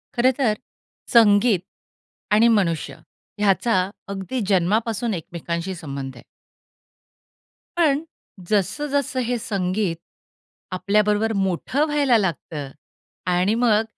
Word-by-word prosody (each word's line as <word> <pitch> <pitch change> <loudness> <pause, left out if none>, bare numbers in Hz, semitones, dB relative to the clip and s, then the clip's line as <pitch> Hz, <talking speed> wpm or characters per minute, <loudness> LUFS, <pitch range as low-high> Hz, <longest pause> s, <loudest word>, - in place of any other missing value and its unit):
खरं 250 +2 +4
तर 240 -6 +2 0.6
संगीत 210 -2 +5 0.8
आणि 225 +2 +6
मनुष्य 165 -6 -2 0.4
ह्याचा 210 +3 +2 0.4
अगदी 200 +6 -3
जन्मापासून 215 +5 +1
एकमेकांशी 170 +1 -4
संबंध 140 -5 -6
आहे. - - -13 1.5
पण 300 -4 +3 0.5
जसं-जसं 270 +7 0
हे 245 +1 -1
संगीत 195 -3 -1 0.8
आपल्याबरोबर 210 +3 +2
मोठं 195 - 0
व्हायला 285 -5 +3
लागतं 160 -7 -3 0.6
आणि 180 +4 +2
मग 225 -2 +3
210 Hz, 90 wpm, -22 LUFS, 180-235 Hz, 1.5 s, आणि